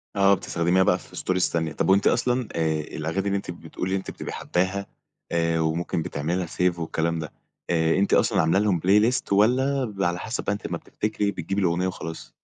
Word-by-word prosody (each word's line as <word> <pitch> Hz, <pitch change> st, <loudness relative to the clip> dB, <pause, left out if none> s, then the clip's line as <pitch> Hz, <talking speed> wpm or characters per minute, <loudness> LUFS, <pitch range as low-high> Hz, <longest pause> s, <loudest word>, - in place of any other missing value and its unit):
آه 100 Hz, 0 st, +5 dB
بتستخدميها 90 Hz, 0 st, +1 dB
بقى -, -, +3 dB
في -, -, -15 dB
Stories 90 Hz, 0 st, 0 dB
تانية. 80 Hz, -2 st, -1 dB
طب -, -, -1 dB
وأنتِ 100 Hz, +1 st, +4 dB
أصلًا 125 Hz, -1 st, +1 dB
آآ 80 Hz, -2 st, +1 dB
الأغاني 80 Hz, +6 st, -3 dB
اللي 100 Hz, 0 st, +1 dB
أنتِ 95 Hz, -, -5 dB
بتقولي 85 Hz, +2 st, -5 dB
إن -, -, +2 dB
أنتِ 95 Hz, -, -6 dB
بتبقي -, -, -7 dB
حاباها 95 Hz, +2 st, -1 dB, 0.5 s
آآ 85 Hz, -1 st, +1 dB
وممكن 80 Hz, +1 st, -1 dB
بتعملي 80 Hz, +2 st, -2 dB
لها 90 Hz, -1 st, -1 dB
Save 90 Hz, +1 st, 0 dB
والكلام 80 Hz, 0 st, -1 dB
ده، 80 Hz, -2 st, -6 dB, 0.4 s
آآ 80 Hz, -1 st, +2 dB
أنتِ 100 Hz, +1 st, +2 dB
أصلًا -, -, +4 dB
عاملة 80 Hz, +4 st, +3 dB
لهم 100 Hz, -4 st, +2 dB
playlist 105 Hz, +8 st, +3 dB
والَّا 130 Hz, +7 st, +3 dB
بيبقي 100 Hz, -5 st, -1 dB
على 85 Hz, 0 st, -2 dB
حسب 115 Hz, +5 st, -4 dB
بقى -, -, 0 dB
أنتِ 100 Hz, -, -7 dB
أمّا -, -, -2 dB
بتفتكري 105 Hz, -1 st, -2 dB
بتجيبي 95 Hz, +3 st, -3 dB
الأغنية 90 Hz, +1 st, +1 dB
وخلاص؟ 80 Hz, -3 st, -7 dB
90 Hz, 200 wpm, -25 LUFS, 85-100 Hz, 0.5 s, آه